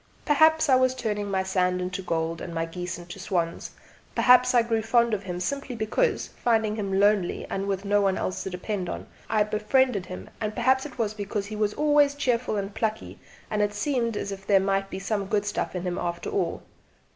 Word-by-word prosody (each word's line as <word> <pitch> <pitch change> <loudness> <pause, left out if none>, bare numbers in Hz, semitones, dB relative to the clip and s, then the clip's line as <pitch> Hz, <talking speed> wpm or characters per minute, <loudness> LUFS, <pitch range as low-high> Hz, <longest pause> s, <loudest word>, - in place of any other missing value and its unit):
Perhaps 315 +2 +4
I 270 - +4
was 255 0 +2
turning 210 -5 -2
my 190 -1 0
sand 180 -1 +1
into 180 +1 -3
gold, 165 -2 -2
and 170 - -6
my 165 0 0
geese 175 +1 -5
into 175 +2 -10
swans; 175 -3 -2 0.5
perhaps 250 0 +5
I 240 - +6
grew 225 -1 0
fond 235 +1 +2
of 205 - 0
him 180 -3 -5
simply 275 +6 -3
because, 235 - 0 0.2
finding 220 -3 +2
him 195 -3 -1
lonely 205 -3 +2
and 195 +1 -2
with 195 0 -2
no 205 +1 +3
one 195 -1 +2
else 185 - -2
to - - -4
depend 185 0 -4
on, - - -5 0.2
I 215 -1 +3
befriended 215 0 +1
him; 185 - -8
and 215 -1 -2
perhaps 260 +3 +2
it 280 - -15
was 220 -3 0
because 205 -1 -3
he 215 +1 -6
was 210 -1 0
always 295 -1 +4
cheerful 245 -5 0
and 200 0 -3
plucky 220 0 -3 0.3
and 210 - +1
it 205 0 0
seemed 235 -2 0
as 200 - -3
if 195 0 -8
there 200 -2 +5
might 195 0 0
be - - -5
some 200 0 -2
good 205 0 0
stuff 205 - -2
in 180 - -3
him 180 -1 -2
after 170 -1 -3
all. 180 -4 -1
205 Hz, 215 wpm, -26 LUFS, 190-235 Hz, 0.5 s, I